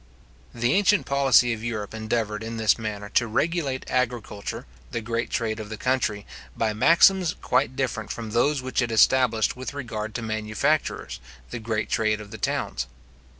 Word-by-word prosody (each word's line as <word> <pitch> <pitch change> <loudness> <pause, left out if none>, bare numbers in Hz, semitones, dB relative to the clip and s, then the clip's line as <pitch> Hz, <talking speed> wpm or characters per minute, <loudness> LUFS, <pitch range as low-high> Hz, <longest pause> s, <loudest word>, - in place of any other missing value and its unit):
The 120 +3 0
ancient 205 +1 +3
policy 135 -3 +4
of 110 -1 -7
Europe 110 -3 -4
endeavoured, 110 -1 -2
in 115 +1 -5
this 110 0 +3
manner, 105 -2 -4
to 120 - +2
regulate 140 +2 -1
agriculture, 120 -5 -2 0.2
the 115 - -3
great 115 +1 -2
trade 110 -1 -1
of 105 -1 -7
the 110 - -6
country, 110 -5 0 0.3
by 110 -1 +1
maxims 170 - +5
quite 125 +4 +1
different 125 -5 -2
from 115 -2 -6
those 130 +4 +2
which 130 0 0
it 120 -1 -1
established 115 0 +3
with 130 +3 -6
regard 110 -6 -5
to 120 - -3
manufactures, 110 +7 -1 0.3
the 120 - -4
great 110 -1 -2
trade 110 -1 +1
of 105 -1 -10
the 110 - -8
towns. - - -2
115 Hz, 165 wpm, -25 LUFS, 110-130 Hz, 0.3 s, maxims